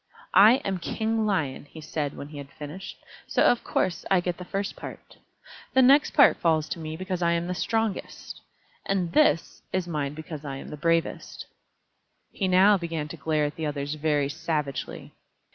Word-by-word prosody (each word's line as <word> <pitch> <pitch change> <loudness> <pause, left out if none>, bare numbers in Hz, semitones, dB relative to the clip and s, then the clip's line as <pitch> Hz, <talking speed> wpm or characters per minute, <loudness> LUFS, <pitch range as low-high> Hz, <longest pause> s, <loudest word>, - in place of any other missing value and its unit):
"I 210 +4 +8
am 190 -2 -1
King 220 +4 -1
Lion," 155 -10 -1
he 150 +2 -12
said, 150 -2 -4
when 140 - -7
he 150 -1 -8
had 140 -1 -9
finished, 155 +7 -8 0.3
"so - - +2
of 245 - +3
course 180 - -1
I 190 - +4
get 175 0 -2
the 180 - -7
first 195 +2 -3
part. - - -10 0.6
This 260 - +7
next 280 +3 +5
part 280 - +7
falls 160 -2 +1
to 170 - -4
me 160 0 -5
because 185 0 -4
I 170 0 +3
am 170 0 -1
the 180 - -2
strongest; 225 +2 -3 0.4
and 185 -4 -1
this 295 - +2
is 185 -2 -1
mine 150 -3 -3
because 155 -1 -8
I 140 -2 -5
am 135 - -8
the - - -6
bravest." 165 +2 -1 0.9
He 195 - -1
now 190 +2 +5
began 165 -3 -4
to - - -7
glare 155 0 0
at 145 - -4
the 160 -1 -2
others 145 0 -3
very 150 -2 +1
savagely. 150 -2 -4
165 Hz, 185 wpm, -26 LUFS, 150-190 Hz, 0.9 s, I